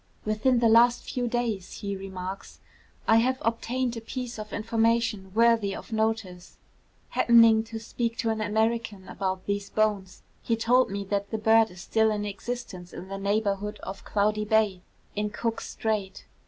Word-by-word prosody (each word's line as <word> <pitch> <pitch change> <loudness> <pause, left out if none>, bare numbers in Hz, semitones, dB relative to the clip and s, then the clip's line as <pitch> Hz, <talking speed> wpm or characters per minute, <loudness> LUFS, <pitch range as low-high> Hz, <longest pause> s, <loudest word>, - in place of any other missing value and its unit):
'Within 215 +4 +2
the 235 -1 +4
last 240 +2 +5
few 245 -1 -2
days,' 230 -6 -2
he 200 -1 -3
remarks, 190 0 -7 0.5
'I 225 - +6
have 255 +3 +2
obtained 240 +2 -1
a 230 - -5
piece 245 0 -6
of 215 0 -7
information 225 -2 0
worthy 230 -3 +3
of - - -10
notice. 220 -5 -2 0.5
Happening 230 -2 +5
to 225 0 -7
speak 230 +1 -3
to 225 - 0
an 220 -1 -2
American 220 -1 -1
about 190 -1 -3
these 200 0 -2
bones, 205 -4 -1 0.2
he 230 - 0
told 245 +3 +3
me 200 0 -3
that 200 0 -2
the 220 - -2
bird 220 +1 +4
is 180 -1 -11
still 220 +4 +2
in 210 -1 -1
existence 200 -3 -6
in 190 - -8
the 195 0 -5
neighbourhood 205 0 -1
of 195 - -7
Cloudy 210 +1 +1
Bay, 210 -3 +2 0.3
in 210 0 -1
Cook's 225 +2 -3
Strait. 210 -4 -3
220 Hz, 165 wpm, -27 LUFS, 200-230 Hz, 0.5 s, I